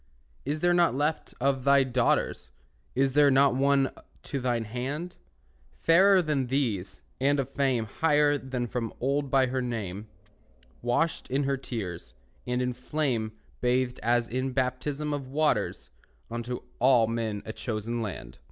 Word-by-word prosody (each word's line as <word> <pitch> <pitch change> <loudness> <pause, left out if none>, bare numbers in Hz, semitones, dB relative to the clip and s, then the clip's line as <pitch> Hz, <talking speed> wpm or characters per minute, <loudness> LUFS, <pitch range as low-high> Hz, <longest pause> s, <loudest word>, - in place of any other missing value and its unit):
Is 150 +3 -2
there 175 0 +4
not 175 -5 +3
left 150 +3 -1
of 135 0 +1
thy 140 0 +5
daughters, 125 -2 0 0.5
Is 135 +1 +2
there 145 0 +6
not 135 -1 +5
one 135 +1 +2 0.3
to 140 - -3
thine 120 -2 0
hand? 135 +10 -4 0.5
Fairer 185 +3 +4
than 145 -5 0
these, 120 -8 -2 0.2
and 140 +2 +2
of 135 -1 -1
fame 135 -5 +1
Higher 145 +4 +2 0.3
from 120 0 -3
of - - -18
old 140 +2 0
by 135 -1 +4
her 130 +1 -1
name; 110 -4 -4 0.7
Washed 120 +8 0
in 135 +3 +1
her 140 0 +1
tears, 90 - -6 0.3
and 125 +1 0
in 125 0 -1
flame 125 -4 -2 0.3
Bathed 125 0 +1
as 120 +1 +2
in 130 +2 -2
baptism 140 +3 -1
of 140 -2 -4
waters, 140 - 0 0.4
Unto 120 +1 -4 0.2
all 125 -2 +5
men 110 -2 -3
a 110 - -5
chosen 115 +1 -3
land. 95 - -6
130 Hz, 150 wpm, -28 LUFS, 120-140 Hz, 0.7 s, there